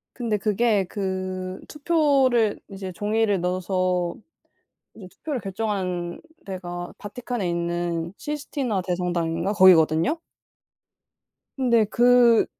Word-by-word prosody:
근데 230 Hz, -4 st, -1 dB
그게 210 Hz, 0 st, +1 dB
그 185 Hz, -1 st, -4 dB
투표를 280 Hz, -8 st, +2 dB
이제 190 Hz, -2 st, -7 dB
종이를 210 Hz, -1 st, 0 dB
넣어서 180 Hz, -1 st, -1 dB, 0.8 s
이제 195 Hz, -4 st, -11 dB
투표를 290 Hz, +7 st, -5 dB
결정한 185 Hz, -4 st, -3 dB, 0.2 s
데가 175 Hz, -2 st, -6 dB
바티칸에 230 Hz, -1 st, -4 dB
있는 170 Hz, 0 st, -2 dB
시스티나 275 Hz, -8 st, -3 dB
대성당인가 175 Hz, 0 st, -1 dB
거기거든요. 185 Hz, -, +5 dB, 1.4 s
근데 235 Hz, -4 st, +3 dB
그 240 Hz, +1 st, +5 dB
195 Hz, 235 characters per minute, -24 LUFS, 180-235 Hz, 1.4 s, 거기거든요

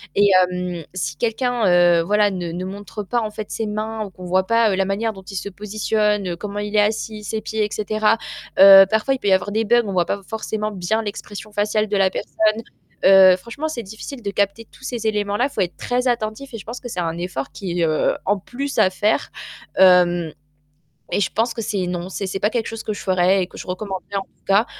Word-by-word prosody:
et 205 Hz, 0 st, +5 dB, 0.2 s
hem, 180 Hz, -2 st, -4 dB
si 155 Hz, -4 st, -3 dB
quelqu'un, 240 Hz, -1 st, 0 dB
heu, 175 Hz, -1 st, +5 dB
voilà, 205 Hz, +2 st, +2 dB
ne 175 Hz, -3 st, -4 dB
ne 180 Hz, +1 st, -4 dB
montre 205 Hz, +2 st, -7 dB
pas, 240 Hz, +4 st, -1 dB
en 215 Hz, -, -2 dB
fait, 210 Hz, 0 st, -7 dB
ses 225 Hz, -, -2 dB
mains 215 Hz, +1 st, -3 dB
ou -, -, -9 dB
qu'on 185 Hz, 0 st, -11 dB
voit 185 Hz, +1 st, +1 dB
pas, 230 Hz, -2 st, +3 dB
heu, -, -, +1 dB
la 190 Hz, 0 st, +1 dB
manière 210 Hz, +4 st, -1 dB
dont 190 Hz, -1 st, -12 dB
il 195 Hz, +1 st, -9 dB
se 200 Hz, -, -4 dB
positionne, 210 Hz, 0 st, -1 dB
heu, 175 Hz, -, -3 dB
comment 205 Hz, 0 st, -5 dB
il 205 Hz, +1 st, -4 dB
est -, -, +6 dB
assis, 215 Hz, 0 st, -2 dB
ses 220 Hz, +1 st, -3 dB
pieds 215 Hz, 0 st, -1 dB
et 210 Hz, -, -5 dB
cetera. 215 Hz, +1 st, +1 dB, 0.4 s
Heu, 195 Hz, 0 st, +10 dB
parfois, 220 Hz, +6 st, +1 dB
il 260 Hz, -, -7 dB
peut 205 Hz, -, -3 dB
y 195 Hz, -, +5 dB
avoir 190 Hz, +2 st, +1 dB
des 220 Hz, +2 st, 0 dB
bugs, 240 Hz, +2 st, +4 dB
on 200 Hz, -, -4 dB
voit 175 Hz, -2 st, +2 dB
pas 200 Hz, -, -3 dB
forcément 215 Hz, 0 st, -4 dB
bien 205 Hz, +3 st, -1 dB
l'expression 205 Hz, 0 st, -7 dB
faciale 210 Hz, +1 st, 0 dB
de 205 Hz, -, 0 dB
la 195 Hz, -1 st, +4 dB
personne. 215 Hz, +2 st, -1 dB, 0.4 s
Heu, 190 Hz, -1 st, +8 dB
franchement, 235 Hz, +10 st, -5 dB
c'est 250 Hz, -7 st, -5 dB
difficile 220 Hz, +6 st, -9 dB
de 200 Hz, -2 st, -3 dB
capter 200 Hz, +3 st, -1 dB
tous -, -, -18 dB
ces 240 Hz, -4 st, -3 dB
éléments-là, 210 Hz, +4 st, 0 dB
faut 240 Hz, -, -7 dB
être 175 Hz, -2 st, -2 dB
très 250 Hz, +1 st, -1 dB
attentif 240 Hz, +2 st, -2 dB
et -, -, -4 dB
je 210 Hz, -, -9 dB
pense 235 Hz, +3 st, -6 dB
que 245 Hz, -, -8 dB
c'est 180 Hz, -5 st, -3 dB
un 165 Hz, 0 st, -2 dB
effort 175 Hz, -6 st, -4 dB
qui 175 Hz, -3 st, -4 dB
est, -, -, +4 dB
heu, 155 Hz, -1 st, +1 dB
en 205 Hz, +1 st, +2 dB
plus 270 Hz, +8 st, -5 dB
à 185 Hz, -, +5 dB
faire. 205 Hz, +3 st, 0 dB, 0.5 s
Hem 175 Hz, -3 st, +5 dB, 0.8 s
et -, -, +1 dB
je 190 Hz, -, +1 dB
pense 230 Hz, +2 st, 0 dB
que 230 Hz, -, -4 dB
c'est 200 Hz, -4 st, -2 dB
non, 180 Hz, 0 st, -4 dB
c'est 195 Hz, +1 st, -4 dB
c'est 190 Hz, -, -3 dB
pas 210 Hz, -, +2 dB
quelque 230 Hz, -2 st, -2 dB
chose 225 Hz, -1 st, -6 dB
que 215 Hz, -, -2 dB
je 205 Hz, -, -7 dB
ferais 185 Hz, +1 st, +2 dB
et 180 Hz, -, -2 dB
que -, -, -13 dB
je -, -, -8 dB
recommanderais, 190 Hz, +1 st, -5 dB
en 195 Hz, -, +1 dB
tout -, -, -26 dB
cas. 200 Hz, +4 st, +3 dB
205 Hz, 245 wpm, -21 LUFS, 185-220 Hz, 0.8 s, Heu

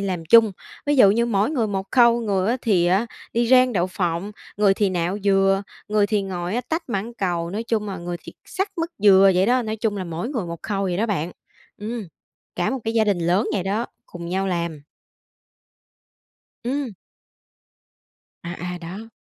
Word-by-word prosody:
làm 185 Hz, -4 st, -3 dB
chung, 220 Hz, +4 st, +6 dB, 0.3 s
ví 290 Hz, 0 st, +2 dB
dụ 205 Hz, -6 st, +7 dB
như 235 Hz, +3 st, +2 dB
mỗi 210 Hz, +1 st, +1 dB
người 250 Hz, -8 st, 0 dB
một 195 Hz, -2 st, -3 dB
khâu, 235 Hz, -2 st, +5 dB
người 200 Hz, -3 st, 0 dB
á, 245 Hz, -, +2 dB
thì 185 Hz, -7 st, +3 dB
á, 190 Hz, +6 st, +2 dB, 0.3 s
đi 235 Hz, 0 st, +1 dB
rang 255 Hz, -1 st, +5 dB
đậu 180 Hz, -4 st, +1 dB
phộng, 180 Hz, +1 st, -2 dB, 0.2 s
người 200 Hz, -1 st, +4 dB
thì 200 Hz, -1 st, +1 dB
nạo 180 Hz, +2 st, -1 dB
dừa, 195 Hz, 0 st, +3 dB, 0.3 s
người 210 Hz, -1 st, +3 dB
thì 205 Hz, -1 st, 0 dB
ngồi, 180 Hz, -1 st, -4 dB
á, 245 Hz, -, +1 dB
tách 325 Hz, 0 st, -2 dB
mãng 225 Hz, +1 st, -3 dB
cầu, 175 Hz, -5 st, -2 dB
nói 210 Hz, +4 st, -3 dB
chung 220 Hz, -3 st, -1 dB
là 190 Hz, -, -4 dB
người 175 Hz, 0 st, -5 dB
thì -, -, -10 dB
xắt 385 Hz, +2 st, -2 dB
mứt 330 Hz, +1 st, -1 dB
dừa 195 Hz, -1 st, +7 dB
vậy 185 Hz, +2 st, +3 dB
đó, 250 Hz, +2 st, +3 dB
nói 220 Hz, -1 st, -3 dB
chung 215 Hz, -1 st, -1 dB
là 190 Hz, -, -3 dB
mỗi 170 Hz, +7 st, -4 dB
người 235 Hz, -10 st, -3 dB
một 170 Hz, -1 st, -7 dB
khâu 200 Hz, -2 st, -2 dB
vậy 185 Hz, -3 st, -1 dB
đó 220 Hz, +5 st, +1 dB
bạn. 180 Hz, -5 st, -2 dB, 0.5 s
Ừm, 215 Hz, -1 st, -5 dB, 0.5 s
cả -, -, 0 dB
một 265 Hz, -, -2 dB
cái 225 Hz, 0 st, -2 dB
gia 225 Hz, -1 st, +4 dB
đình 205 Hz, -4 st, +1 dB
lớn 175 Hz, +5 st, +1 dB
vậy 195 Hz, -, 0 dB
đó, 205 Hz, +5 st, -1 dB, 0.2 s
cùng 170 Hz, -1 st, -8 dB
nhau 190 Hz, +2 st, -1 dB
làm. 170 Hz, -4 st, -2 dB, 1.8 s
Ừm. 265 Hz, +1 st, -2 dB, 1.5 s
À, 170 Hz, -, -5 dB, 0.2 s
à, -, -, -6 dB
đó. 190 Hz, +7 st, -8 dB
200 Hz, 200 wpm, -23 LUFS, 180-230 Hz, 1.8 s, dụ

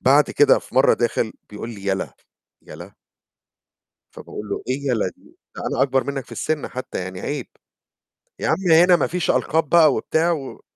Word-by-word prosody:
بعد 140 Hz, +3 st, +4 dB
كده 145 Hz, -, +5 dB
في -, -, -16 dB
مّرة 130 Hz, -, +5 dB
داخل 115 Hz, -1 st, -1 dB, 0.2 s
بيقول 105 Hz, +3 st, -7 dB
لي: 100 Hz, -3 st, -9 dB
"يلا." 95 Hz, -1 st, -2 dB, 0.5 s
يلا! 85 Hz, +5 st, -11 dB, 1.2 s
فباقول 105 Hz, -1 st, -9 dB
له: -, -, -4 dB
"إيه 140 Hz, +2 st, -2 dB
يلا 110 Hz, -6 st, +1 dB
دي؟ -, -, -22 dB, 0.2 s
ده -, -, -7 dB
أنا -, -, -1 dB
أكبر 135 Hz, -1 st, +1 dB
منّك 140 Hz, -2 st, -4 dB
في -, -, -19 dB
السِن 155 Hz, -2 st, -2 dB
حتّى 130 Hz, -5 st, -6 dB
يعني 90 Hz, 0 st, -6 dB
عيب." 145 Hz, -, -4 dB, 0.9 s
"يا -, -, -2 dB
عم 185 Hz, -3 st, +1 dB
هنا 175 Hz, +2 st, +7 dB
ما -, -, 0 dB
فيش 180 Hz, 0 st, -1 dB
ألقاب 160 Hz, -1 st, +1 dB
بقى 165 Hz, 0 st, +5 dB
وبتاع 165 Hz, +2 st, +1 dB
و" 140 Hz, -5 st, -6 dB
135 Hz, 180 wpm, -21 LUFS, 110-160 Hz, 1.2 s, هنا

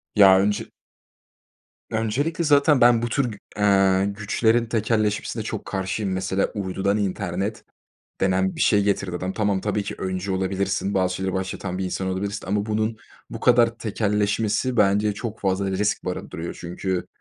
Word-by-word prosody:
Ya 95 Hz, -2 st, +8 dB
önce 100 Hz, +1 st, 0 dB, 1.2 s
öncelikle 135 Hz, +10 st, -1 dB
zaten 145 Hz, -2 st, +4 dB
ben 120 Hz, -1 st, +6 dB
bu 120 Hz, -, -1 dB
tür 140 Hz, +1 st, +1 dB
gü 105 Hz, -, -9 dB, 0.2 s
eee, 95 Hz, -2 st, +4 dB
güçlerin 110 Hz, +3 st, +1 dB
tekelleşmesine 110 Hz, -2 st, -1 dB
çok -, -, -5 dB
karşıyım. 95 Hz, +1 st, -2 dB
Mesela, 95 Hz, +1 st, 0 dB
uydudan 100 Hz, +1 st, -1 dB
internet 100 Hz, +2 st, -2 dB, 0.6 s
denen 95 Hz, 0 st, +1 dB
bir -, -, -6 dB
şey 105 Hz, -1 st, +4 dB
getirdi 100 Hz, -3 st, -1 dB
adam. 90 Hz, +2 st, -3 dB
Tamam, 100 Hz, -3 st, 0 dB
tabii 105 Hz, 0 st, -1 dB
ki, 100 Hz, -, -5 dB
öncü 95 Hz, +1 st, -3 dB
olabilirsin, 95 Hz, +1 st, -1 dB
bazı 95 Hz, -1 st, +1 dB
şeyleri 95 Hz, 0 st, -2 dB
başlatan 95 Hz, -1 st, -3 dB
bir 95 Hz, -, -2 dB
insan 95 Hz, +1 st, -3 dB
olabilirsin 100 Hz, +1 st, -3 dB
ama 100 Hz, +1 st, 0 dB
bunun 110 Hz, +1 st, -1 dB, 0.3 s
bu -, -, -7 dB
kadar 120 Hz, -1 st, +4 dB
tekelleşmesi 105 Hz, +3 st, 0 dB
bence 105 Hz, 0 st, +3 dB
çok 110 Hz, 0 st, -6 dB
fazla 95 Hz, 0 st, 0 dB
risk 100 Hz, +2 st, 0 dB
barındırıyor 85 Hz, -2 st, -5 dB
çünkü 90 Hz, +1 st, -3 dB
100 Hz, 150 wpm, -23 LUFS, 95-110 Hz, 1.2 s, Ya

